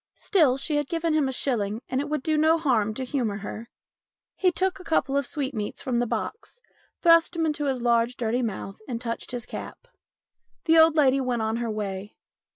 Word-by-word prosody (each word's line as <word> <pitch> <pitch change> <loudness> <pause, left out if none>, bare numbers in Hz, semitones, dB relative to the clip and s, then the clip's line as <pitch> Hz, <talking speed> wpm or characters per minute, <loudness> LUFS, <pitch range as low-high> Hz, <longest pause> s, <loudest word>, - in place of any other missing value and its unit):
Still, 305 -10 +3
she 295 +2 0
had 295 -1 -1
given 330 -1 0
him 305 -3 +2
a - - -1
shilling 225 -5 -1
and 260 +1 -1
it 290 - -5
would 300 -3 -2
do 315 - +1
no 315 +2 +4
harm 230 -9 +1
to 265 - -3
humour 245 -7 -1
her. 230 +2 -7 0.7
He 370 -2 +2
took 380 +2 -1
a - - -10
couple 295 -4 0
of 280 -3 +1
sweetmeats 265 -1 -4
from 255 -5 0
the 240 - 0
box, 455 - -5 0.4
thrust 335 -1 +5
them 330 -2 0
into 300 -1 -1
his 260 -3 -1
large, 235 0 +2
dirty 240 +1 0
mouth, 195 -4 -4
and 235 -3 -3
touched 230 -1 -4
his 245 -2 -5
cap. - - -8 0.8
The 325 0 +5
old 320 -1 +6
lady 275 -3 +4
went 245 -3 -1
on 220 +1 -1
her 235 -1 -2
way. 205 -1 -4
265 Hz, 205 wpm, -26 LUFS, 230-315 Hz, 0.8 s, old